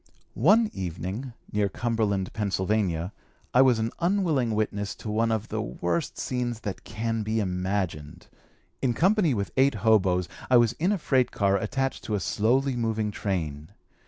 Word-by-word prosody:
One 210 - +4
evening, 95 +8 -5 0.2
near 105 -1 +1
Cumberland, 105 -3 -1
Pennsylvania, 95 -3 0 0.4
I 125 - +6
was 130 -3 +5
an 110 +1 -1
unwilling 170 - +1
witness 100 -2 -2
of - - -16
one 110 +2 +1
of 110 0 -2
the - - -2
worst 85 - -2
scenes 120 -3 -2
that 100 -5 -5
can 115 +2 -2
be 110 +1 -1
imagined. 90 -4 -2 0.6
In 125 -3 +1
company 185 - +3
with 100 -2 -2
eight 135 -1 +4
hoboes, 95 -5 +3 0.2
I 125 - +7
was 120 -1 +4
in 175 +5 +2
a 205 - +1
freight 130 -6 +2
car 100 -1 +1
attached 135 +7 -2
to 105 - -1
a - - 0
slowly 125 +7 +1
moving 110 -3 -1
train. 80 -8 -3
110 Hz, 160 wpm, -26 LUFS, 95-125 Hz, 0.6 s, I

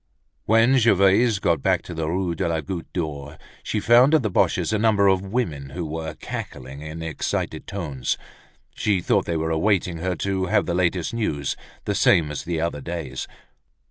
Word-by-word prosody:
When 115 +5 +4
Gervaise 105 +1 +4
got 85 -6 +1
back - - +1
to 90 - -8
the 80 -1 -2
Rue 90 0 -1
de 85 +2 -1
la 80 -1 0
Goutte 85 +3 -6
d'Or 75 -3 -4 0.2
she 105 - -2
found 125 +7 +5
at 155 - +3
the 110 - -1
Boches' 110 - +1
a 110 - +1
number 105 -2 +4
of 95 -1 +3
women 95 - -3
who 85 +3 -5
were 80 +1 -5
cackling 70 +2 -7
in 80 +2 -7
excited 80 -3 -3
tones. 75 -10 -3 0.6
She 100 -3 +1
thought - - +1
they 85 - 0
were 80 +1 -1
awaiting 90 0 +1
her 90 +1 -1
to 95 0 -1
have - - +2
the 85 - -2
latest 90 0 0
news, 75 -12 -1 0.3
the - - 0
same 75 -3 +3
as 75 - -5
the 85 -2 -2
other 80 -3 -2
days. 85 +1 -5
85 Hz, 185 wpm, -23 LUFS, 80-100 Hz, 0.6 s, found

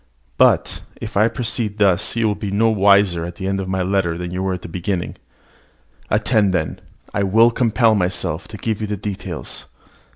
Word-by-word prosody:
But, - - +3 0.2
if - - -7
I 105 +3 +4
proceed 115 -3 -3
thus, 100 -1 +2
you 115 -1 +1
will 105 - +1
be 105 0 -5
no 110 +3 +2
wiser 100 -4 +4
at 85 +1 -6
the 95 - -6
end 95 0 -1
of 95 -1 -4
my 95 -1 0
letter 90 -3 0
than 90 0 -5
you 90 +1 -3
were 95 0 -1
at 90 - -10
the - - -6
beginning. 90 +1 -3 0.9
Attend, 105 -2 +2
then, 80 -3 +1
and 65 - -12 0.3
I - - 0
will 110 +5 +4
compel 115 -1 +3
myself 90 -3 -1
to 105 - -9
give 110 0 -3
you 105 - -2
the 105 0 -3
details. 100 0 -6
100 Hz, 200 wpm, -20 LUFS, 90-105 Hz, 0.9 s, I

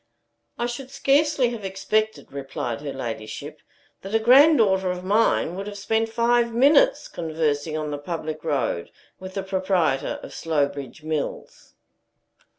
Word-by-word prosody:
"I 240 - -1
should 245 +2 -5
scarcely 275 -1 +2
have 230 -4 -6
expected," 205 +3 -1
replied 135 -4 -4
her 145 -2 -4
ladyship, 110 -5 -6 0.4
"that 195 +3 -4
a - - +5
granddaughter 225 -7 +5
of 180 0 -3
mine 205 -3 +2
would 195 +2 -5
have 205 -1 -7
spent 225 +3 0
five 235 +1 +2
minutes 315 - +4
conversing 155 -2 -2
on 155 -1 -3
the 145 - -4
public 155 0 -5
road 130 - -1 0.3
with 185 0 -9
the 195 - -2
proprietor 185 -7 0
of - - -9
Slowbridge 145 -2 -2
Mills." 155 -2 -5
190 Hz, 140 wpm, -24 LUFS, 150-230 Hz, 0.4 s, a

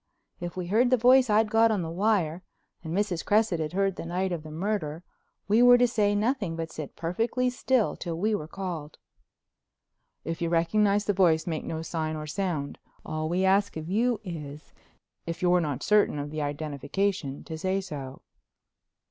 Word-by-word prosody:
If 175 +1 -6
we 180 - -3
heard 225 +7 +3
the 255 - +4
voice 250 +1 +5
I'd 215 0 +3
got 225 0 +5
on 205 -5 0
the 165 - -5
wire 180 -3 +1 0.4
and 160 - -6
Mrs. 185 -2 -1
Cresset 210 -4 +2
had 155 +1 -3
heard 195 0 0
the - - -6
night 185 +2 -1
of 170 -3 -3
the 155 - -10
murder 165 -2 -3 0.4
we 215 +4 +4
were 245 0 +8
to 245 0 +4
say 210 -3 +1
nothing, 210 -5 0
but 165 0 -5
sit 155 -3 -7
perfectly 230 +9 -1
still 250 -2 +1
till 170 -2 -5
we 215 +5 +1
were 155 -7 -2
called. 170 -5 -6 1.3
"If 165 0 -4
you 170 - 0
recognize 200 +5 +2
the 205 - +1
voice 170 -4 +3
make 160 -3 -3
no 160 0 -4
sign 160 -1 -3
or 155 0 -5
sound. 155 -3 -3 0.3
All 155 0 -3
we 185 +3 +1
ask 195 -1 +2
of 160 0 -6
you 230 +2 +1
is, 150 -5 -8 0.5
if 170 +1 -4
you're 180 0 +4
not 145 -4 -3
certain 210 -7 +3
of 145 0 -4
the 155 0 -3
identification, 145 +2 -2
to 160 - -7
say 185 +4 -1
so." 145 -8 -7
180 Hz, 185 wpm, -27 LUFS, 160-210 Hz, 1.3 s, were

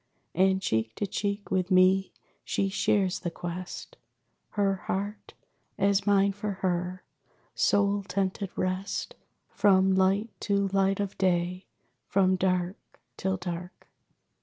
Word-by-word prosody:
And 190 +2 +3
cheek 110 -10 -1
to - - -1
cheek 200 +1 -3
with 185 -1 +1
me 185 +1 +4 0.3
she 195 - 0
shares 195 -1 +1
the 175 - -3
quest, 175 +1 -7 0.6
Her 200 -2 +1
heart, 205 +3 -4 0.4
as 200 +1 +2
mine 200 0 +4
for 205 +1 -3
her, 180 0 -1 0.5
sole 200 0 +2
tented 195 0 -2
rest 185 +2 -2 0.4
From 190 -2 +4
light 195 +4 +2
to 200 -1 +1
light 195 0 +2
of 200 -1 -2
day; 180 0 0 0.4
from 190 -1 +3
dark 185 0 0 0.4
till 190 0 -1
Dark. 175 0 -7
190 Hz, 120 wpm, -28 LUFS, 185-200 Hz, 0.6 s, me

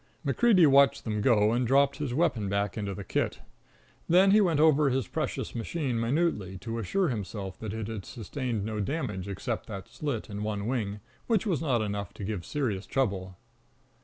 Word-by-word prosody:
MacCreedy 220 -8 +5
watched 140 -1 +5
them 105 -2 -2
go, 105 -2 +4
and 120 +1 +1
dropped 140 +2 +3
his 145 -4 -3
weapon 130 - +1
back 100 -1 -1
into 100 -3 -3
the 100 - -6
kit. - - -1 0.7
Then 185 +3 +6
he 210 +1 +6
went 170 -6 +2
over 150 -2 +5
his 130 -5 0
precious - - -3
machine 125 0 -2
minutely, 115 - 0
to 115 +4 -5
assure 180 - 0
himself 100 -4 -5
that 110 -2 -5
it 110 -1 -4
had 110 -4 -5
sustained 120 -2 -4
no 110 -1 -3
damage 100 - -3
except 100 -2 -4
that 95 -1 -7
slit 140 -7 -4
in 100 -1 -6
one 105 -1 -2
wing, 105 -4 -2 0.3
which 225 -3 +2
was 175 -10 0
not 125 -8 +1
enough 100 -2 -4
to - - -7
give 95 -4 -4
serious 110 -10 -2
trouble. 95 -8 -1
115 Hz, 185 wpm, -28 LUFS, 100-140 Hz, 0.7 s, Then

